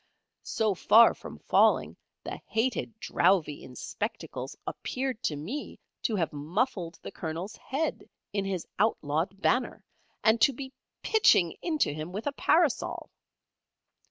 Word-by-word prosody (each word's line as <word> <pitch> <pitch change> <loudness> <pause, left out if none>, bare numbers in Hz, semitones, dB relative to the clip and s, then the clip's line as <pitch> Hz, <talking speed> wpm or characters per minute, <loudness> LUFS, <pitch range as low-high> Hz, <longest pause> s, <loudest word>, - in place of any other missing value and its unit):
So 215 -2 0
far 220 +5 +6
from - - -10
falling, - - +3 0.3
the - - -6
hated 225 -1 -1
Drowvey 170 -8 +2
in 125 - -11
spectacles - - -5
appeared 260 -3 -3
to 150 - -1
me 200 - -6 0.2
to 225 - 0
have 165 -6 -1
muffled 170 - -2
the - - -6
Colonel's 170 +5 -5
head 290 +5 -3 0.2
in 200 -1 0
his 190 -3 -3
outlawed 185 -2 0
banner, 250 +4 +1 0.4
and 225 +1 +4
to 275 - +6
be 265 +1 -8 0.3
pitching 190 - +4
into 310 - +1
him 155 +3 -6
with 205 +4 -5
a 285 - 0
parasol. 315 -1 +1
210 Hz, 130 wpm, -29 LUFS, 165-255 Hz, 0.4 s, far